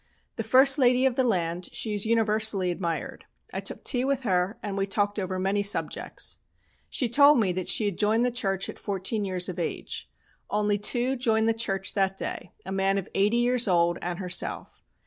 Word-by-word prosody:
The - - -3
first 265 +5 +4
lady 255 0 +4
of 265 - +2
the 260 - +1
land, 175 -6 -1
she 215 - -1
is 205 +1 +1
universally 215 -4 +1
admired. 170 -2 -4 0.3
I - - -2
took - - -5
tea 250 -2 +2
with 270 -1 -1
her 185 -1 0
and 205 -2 -3
we 195 0 -1
talked 205 +1 +1
over 185 -1 -3
many 195 +2 0
subjects. 200 0 -1 0.5
She 255 - 0
told 285 +3 +6
me 200 -5 +1
that 185 0 -2
she 215 - +4
had 200 -4 -3
joined 220 +3 +2
the 250 - 0
church 195 -5 -1
at - - -9
fourteen 200 +2 -2
years 185 -2 -2
of 180 -1 -6
age. 170 - -5 0.4
Only 210 0 0
two 245 +5 +3
joined 225 -3 +1
the 225 - +3
church 195 -4 -1
that 195 -1 0
day, - - -5
a - - -6
man 195 0 +1
of 195 - -4
eighty 205 +4 +2
years 245 -1 +2
old 175 -1 +2
and 175 0 -3
herself. 185 -1 -3
205 Hz, 200 wpm, -26 LUFS, 190-235 Hz, 0.5 s, told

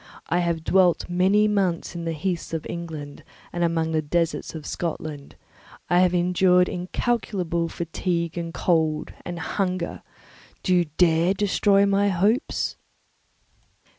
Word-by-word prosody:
I 175 - +2
have 170 -2 -1
dwelt 180 -1 +3
many 195 +4 +3
months 190 -5 0
in 170 -1 -5
the 165 - -1
heaths 170 +1 -3
of 160 - -4
England 155 -4 -7 0.3
and 175 - -1
among 165 -1 0
the 160 -1 +1
deserts 165 +2 -1
of 155 -2 -7
Scotland. 155 -4 -5 0.6
I 175 - +5
have 180 0 +3
endured 180 +1 +4
incalculable 180 -3 -1
fatigue, 170 0 -2
and 170 -1 -4
cold, 160 -3 0
and 175 -1 -5
hunger; 180 +1 -2 0.6
do 185 - +2
you 175 -1 +4
dare 170 +1 +4
destroy 200 0 +3
my 200 0 +2
hopes?" 205 - 0
175 Hz, 135 wpm, -24 LUFS, 165-185 Hz, 0.6 s, I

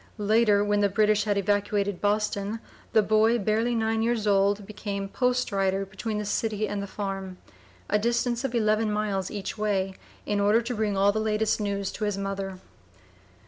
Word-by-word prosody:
Later, 210 -1 +3
when 205 0 +1
the 205 -1 +3
British 210 +1 +2
had 205 -1 +1
evacuated 205 -1 0
Boston, 210 +1 0 0.3
the 220 - +4
boy, 215 +3 +3
barely 225 +3 0
nine 225 0 0
years 230 -1 0
old, 200 0 +2
became 200 -1 -5
"post 250 +3 0
rider" 195 0 0
between 210 +3 -4
the 210 - -3
city 215 0 -1
and 205 -1 -3
the 200 - -5
farm, 195 -2 -5 0.5
a 210 - +2
distance 235 +2 0
of 260 -2 -2
eleven 215 -1 +2
miles 205 -3 -1
each 205 +1 -5
way, 195 -2 0 0.3
in 205 -1 0
order 205 +3 +4
to 245 +2 -3
bring 210 -2 -1
all 200 +1 +4
the 220 - -2
latest 215 0 0
news 200 -1 -2
to 215 - -3
his 205 -2 -1
mother. 195 -1 -4
210 Hz, 180 wpm, -26 LUFS, 200-220 Hz, 0.5 s, the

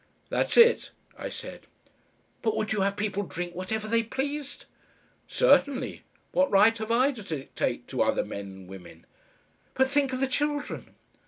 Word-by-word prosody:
"That's - - 0
it," 470 0 +6 0.3
I - - -5
said. - - -8 0.7
"But 220 -2 0
would 215 0 -1
you 210 - 0
have 200 +1 0
people 205 -1 -1
drink 175 -2 -5
whatever 210 +4 -3
they 230 +1 +2
pleased?" 280 +5 -4 0.6
"Certainly. 285 - +2 0.3
What 280 0 +3
right 210 +3 +5
have 220 +1 -3
I 255 +4 +4
to 245 -6 -9
dictate 155 -8 -3
to - - -1
other - - +2
men 100 0 -6
and 95 -1 -11
women?" 95 -2 -12 0.7
"But 265 0 +2
think 285 -2 +2
of 255 - -2
the 270 - +2
children!" 290 +2 -2
225 Hz, 160 wpm, -27 LUFS, 195-275 Hz, 0.7 s, it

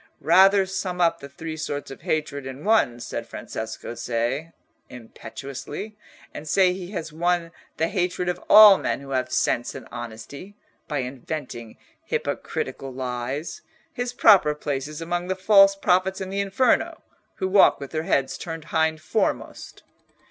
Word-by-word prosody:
"Rather 190 +3 +6
sum 190 -1 -4
up 170 -1 +2
the 140 - -10
three 160 +3 -7
sorts 145 -3 -5
of 135 - -10
hatred 145 -3 -2
in 135 +2 -8
one," 205 - +2
said - - -6
Francesco 110 +1 -6
Cei, 125 +7 -2 0.4
impetuously, 135 - -8 0.4
"and 155 - -8
say 185 +1 +4
he 180 -1 -7
has 165 -6 -6
won 170 +1 0 0.3
the 160 - +1
hatred 180 -1 -1
of 180 - -3
all 210 -2 +10
men - - -2
who 135 0 -10
have 130 -1 -1
sense 120 - 0
and - - -9
honesty, 120 - -9 0.3
by 150 - -2
inventing 125 -2 -7 0.3
hypocritical 135 -1 -4
lies. 130 +3 -4 0.3
His 245 -4 -3
proper 195 -11 +5
place 140 -2 -3
is 150 +1 -8
among 175 +1 -3
the 190 - -1
false 195 +1 +6
prophets 190 0 +1
in 190 -1 -5
the 200 - -2
Inferno, 200 +6 +1 0.3
who 190 - -2
walk 195 +1 +5
with 140 -1 -8
their 155 - -1
heads 135 -4 0
turned 165 -2 -6
hind 160 -1 +1
foremost." 215 +7 -3
160 Hz, 155 wpm, -24 LUFS, 135-190 Hz, 0.4 s, all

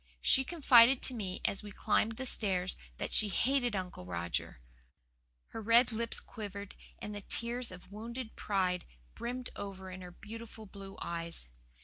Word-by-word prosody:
She 265 - +6
confided 265 -5 +6
to 260 - +7
me 195 -6 -4
as 195 - +1
we 210 - -9
climbed 225 +3 +1
the 260 +4 -5
stairs 190 -7 0 0.2
that - - -4
she 210 - +8
hated 245 +1 +1
Uncle 185 - -4
Roger. 85 -6 -3 0.9
Her 225 - -6
red 235 +3 +5
lips 230 +1 0
quivered 200 -2 -7 0.2
and 210 - -6
the 205 - -5
tears 235 +4 -1
of 180 +1 -12
wounded 230 +3 -6
pride 185 -3 0 0.3
brimmed 250 +1 -4
over 190 -2 -6
in 185 0 -8
her 180 - -8
beautiful 220 +4 -10
blue 195 -1 -10
eyes. 170 - -4
210 Hz, 155 wpm, -33 LUFS, 185-235 Hz, 0.9 s, she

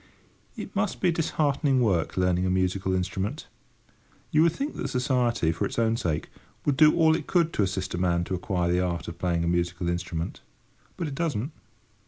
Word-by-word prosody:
It - - -8
must - - 0
be 180 - +3
disheartening 145 -4 +1
work 95 -10 +1
learning 90 0 +2
a - - +1
musical 95 +1 0
instrument. 95 - -2 0.9
You 155 - +4
would 165 0 +5
think 280 - -3
that - - -2
Society, 125 - +1
for 85 +5 -3
its 100 - -3
own 115 -1 +2
sake, 85 -10 -2 0.4
would 145 - +2
do 155 +1 +6
all 160 -2 +5
it - - -4
could 170 -2 +2
to - - +1
assist 95 -1 -1
a 85 - -2
man 85 -1 +1
to 90 - -4
acquire 90 -1 0
the 90 - +2
art 90 -2 -2
of 85 0 -7
playing 85 -2 0
a - - 0
musical 85 0 0
instrument. 85 -1 -3 0.6
But 170 - -2
it 145 - -5
doesn't! 140 -4 -2
95 Hz, 195 wpm, -27 LUFS, 90-140 Hz, 0.9 s, do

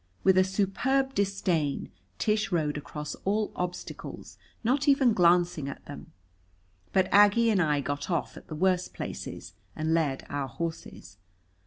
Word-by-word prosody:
With 190 -1 +5
a 185 - +6
superb 215 +8 0
disdain 185 - 0 0.3
Tish 215 -1 0
rode 155 -4 0
across 150 0 -6
all 210 +2 0
obstacles, 180 0 -6 0.2
not 265 +5 +1
even 275 -4 +5
glancing 175 -5 +3
at - - -9
them. 145 - -10 0.8
But 190 -1 +3
Aggie 205 +3 +6
and 195 -3 +3
I 150 -3 +2
got 145 +4 -4
off 170 -3 -1
at - - -12
the 155 - -6
worst 180 +2 +1
places - - -6 0.2
and 155 +1 0
led 150 -5 0
our 145 -1 -3
horses. 160 - -6
180 Hz, 145 wpm, -28 LUFS, 150-205 Hz, 0.8 s, a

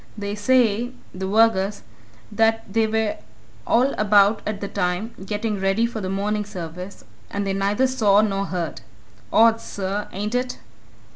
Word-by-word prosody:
They 200 -1 -4
say 235 +1 +2 0.2
the 190 +1 -4
vergers 205 -1 +2 0.5
that 225 +1 +2
they 225 0 +3
were 220 -1 0 0.5
all 255 +4 +3
about 205 0 +4
at 210 -2 -3
the 200 - -4
time, 180 +5 -2
getting 210 +1 -2
ready 195 +4 +2
for 235 -2 -4
the 185 - -3
morning 210 +2 -1
service, 180 -1 -8 0.2
and 200 0 -3
they 195 - -1
neither 200 +6 +1
saw 215 -6 +4
nor 200 -2 0
heard. 175 -3 -4 0.5
Odd, 225 0 +5
sir, 200 +1 -4
ain't 210 +3 -4
it?" 250 0 -1
210 Hz, 150 wpm, -23 LUFS, 195-225 Hz, 0.5 s, Odd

